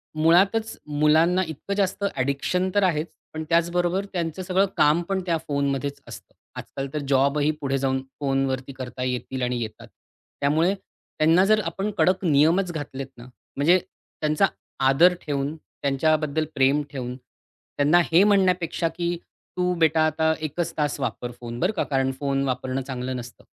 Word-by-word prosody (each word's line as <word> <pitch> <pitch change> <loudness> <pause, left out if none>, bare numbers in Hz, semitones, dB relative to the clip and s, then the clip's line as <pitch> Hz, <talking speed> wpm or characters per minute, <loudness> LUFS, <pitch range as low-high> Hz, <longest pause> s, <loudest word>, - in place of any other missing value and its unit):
मुळातच 190 +8 +3
मुलांना 155 +5 +3
इतकं 160 +5 -5
जास्त 195 0 -1
ॲडिक्शन 140 +8 0
तर 205 - +4
आहेच 165 -3 +1 0.3
पण 160 0 -4
त्याचबरोबर 175 +3 +1
त्यांचं 170 0 -2
सगळं 190 +2 +2
काम 150 +3 +4
पण 195 -1 0
त्या 170 -3 +1
फोनमध्येच 140 -1 -1
असतं. - - -11 0.3
आजकाल 135 0 -6
तर 150 - -1
जॉबही 140 +2 +2
पुढे 135 -1 0
जाऊन 135 0 0 0.2
फोनवरती 135 -1 -1
करता 125 -1 -6
येतील 125 +1 -3
आणि 125 0 -1
येतात. 110 -1 -7 0.5
त्यामुळे 160 +7 +3
त्यांना 175 -2 0
जर 215 +1 +4
आपण 195 +5 -2
कडक 185 +3 +2
नियमच 165 +5 +3
घातलेत 140 -4 -5
ना 120 - -11
म्हणजे 140 +6 +1
त्यांचा 155 -2 -2 0.4
आदर 170 +7 +6
ठेवून 145 +1 -2
त्यांच्याबद्दल 155 +1 0
प्रेम 135 +2 +3
ठेवून 125 -3 -5
त्यांना 145 +5 -1
हे 175 +4 +6
म्हणण्यापेक्षा, 185 -4 +2
की 170 0 -2 0.4
तू 180 0 +1
बेटा 160 0 +4
आता 160 +1 +2
1 155 +1 -5
च 170 - -2
तास 145 -2 -1
वापर 120 -1 -3
फोन 120 0 -6
बरं 180 +5 +2
का? 185 - 0
कारण 135 -1 0
फोन 140 -1 0
वापरणं 130 +1 -2
चांगलं 130 -1 -4
नसतं. 120 0 -10
155 Hz, 155 wpm, -24 LUFS, 135-175 Hz, 0.5 s, आदर